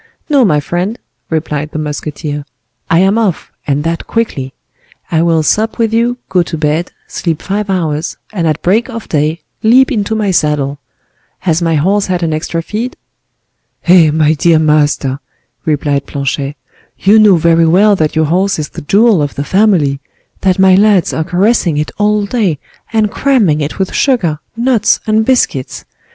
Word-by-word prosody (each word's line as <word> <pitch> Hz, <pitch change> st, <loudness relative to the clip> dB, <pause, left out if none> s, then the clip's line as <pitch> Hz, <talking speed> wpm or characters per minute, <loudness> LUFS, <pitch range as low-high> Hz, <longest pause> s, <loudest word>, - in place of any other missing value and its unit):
"No, 280 Hz, -3 st, +4 dB
my 155 Hz, -9 st, +2 dB
friend," 180 Hz, +9 st, -3 dB, 0.3 s
replied 150 Hz, -2 st, -2 dB
the -, -, -3 dB
musketeer; 150 Hz, 0 st, -4 dB, 0.5 s
"I 165 Hz, -, +3 dB
am 195 Hz, +4 st, +2 dB
off, 200 Hz, -7 st, -2 dB, 0.2 s
and 145 Hz, 0 st, 0 dB
that 165 Hz, +1 st, -3 dB
quickly. 145 Hz, -, -2 dB, 0.6 s
I 160 Hz, -1 st, +2 dB
will 165 Hz, -2 st, +2 dB
sup 220 Hz, +8 st, 0 dB
with 225 Hz, -2 st, 0 dB
you, 235 Hz, +2 st, +1 dB
go 185 Hz, -, +2 dB
to 170 Hz, -1 st, -4 dB
bed, 155 Hz, +3 st, -1 dB
sleep 165 Hz, -3 st, -3 dB
five 205 Hz, +1 st, -3 dB
hours, 160 Hz, -4 st, -2 dB, 0.2 s
and 170 Hz, -5 st, -1 dB
at 155 Hz, 0 st, -1 dB
break 220 Hz, +8 st, +1 dB
of 230 Hz, -3 st, -7 dB
day 155 Hz, +2 st, -1 dB, 0.2 s
leap 255 Hz, +5 st, +4 dB
into 220 Hz, -2 st, -1 dB
my 210 Hz, -3 st, 0 dB
saddle. 145 Hz, -4 st, 0 dB, 0.6 s
Has 170 Hz, -2 st, 0 dB
my 165 Hz, -1 st, +1 dB
horse 195 Hz, +7 st, +1 dB
had 180 Hz, -2 st, -1 dB
an 160 Hz, -1 st, 0 dB
extra 165 Hz, +2 st, -3 dB
feed?" 230 Hz, +8 st, -4 dB, 0.9 s
"Eh! 175 Hz, -3 st, +6 dB
my 155 Hz, 0 st, +2 dB
dear 160 Hz, +2 st, +3 dB
master," 150 Hz, -3 st, +1 dB, 0.5 s
replied 145 Hz, -2 st, -1 dB
Planchet, 140 Hz, 0 st, -3 dB, 0.4 s
"you 210 Hz, +3 st, +4 dB
know 210 Hz, -3 st, +6 dB
very 165 Hz, 0 st, +3 dB
well 200 Hz, +5 st, +4 dB
that 155 Hz, -4 st, -1 dB
your 160 Hz, 0 st, +2 dB
horse 185 Hz, +5 st, +1 dB
is 150 Hz, -2 st, -4 dB
the -, -, -9 dB
jewel 200 Hz, +4 st, +3 dB
of 145 Hz, -1 st, -3 dB
the 140 Hz, -, -3 dB
family; 170 Hz, -6 st, +2 dB, 0.4 s
that 185 Hz, -2 st, +1 dB
my 190 Hz, -1 st, +5 dB
lads 200 Hz, -1 st, +3 dB
are 160 Hz, -, -1 dB
caressing 180 Hz, -1 st, +1 dB
it 150 Hz, +1 st, -2 dB
all 210 Hz, 0 st, +1 dB
day, 200 Hz, -, 0 dB, 0.3 s
and 215 Hz, -2 st, +1 dB
cramming 220 Hz, -, +1 dB
it 145 Hz, -, -4 dB
with 190 Hz, -1 st, -2 dB
sugar, 185 Hz, -, +1 dB, 0.2 s
nuts, 235 Hz, -3 st, +2 dB
and 220 Hz, 0 st, +1 dB
biscuits. 240 Hz, -, 0 dB
170 Hz, 170 wpm, -13 LUFS, 150-210 Hz, 0.9 s, Eh